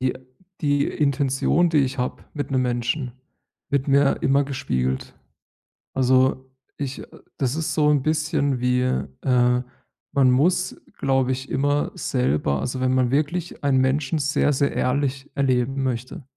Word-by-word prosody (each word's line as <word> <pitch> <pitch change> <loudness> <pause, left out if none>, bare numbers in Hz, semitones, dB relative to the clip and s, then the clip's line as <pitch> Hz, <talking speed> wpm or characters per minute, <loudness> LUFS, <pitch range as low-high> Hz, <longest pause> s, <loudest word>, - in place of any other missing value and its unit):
die 130 0 +1 0.5
die 145 -2 +2
Intention, 140 +4 +1
die 160 -2 +2
ich 135 -1 0
habe 125 - -3
mit 145 -1 -4
'nem 130 -1 +2
Menschen 125 +2 -1 0.6
wird 140 0 0
mir 140 0 +3
immer 140 +1 +3
gespiegelt. 65 - -2 0.8
Also 130 0 +2 0.3
ich 140 -2 -4
äh, - - -9 0.3
das 135 0 0
ist 160 -1 -2
so 150 -1 +3
'n 145 -2 +3
bisschen 150 -3 0
wie, 125 0 +1
äh 125 - +1 0.5
man 135 -3 +4
muss, 175 +7 +2 0.2
glaube 135 -1 +1
ich, 130 +1 -4
immer 145 +2 +1
selber 70 +2 0
also 130 +1 -3
wenn 130 0 +2
man 125 -1 +2
wirklich 155 +5 -1
einen 140 -2 +3
Menschen 135 +3 +1
sehr, 145 0 +1
sehr 140 +1 +1
ehrlich 135 +1 -1
erleben 135 0 +1
möchte, 130 +2 -4
135 Hz, 145 wpm, -23 LUFS, 125-145 Hz, 0.8 s, man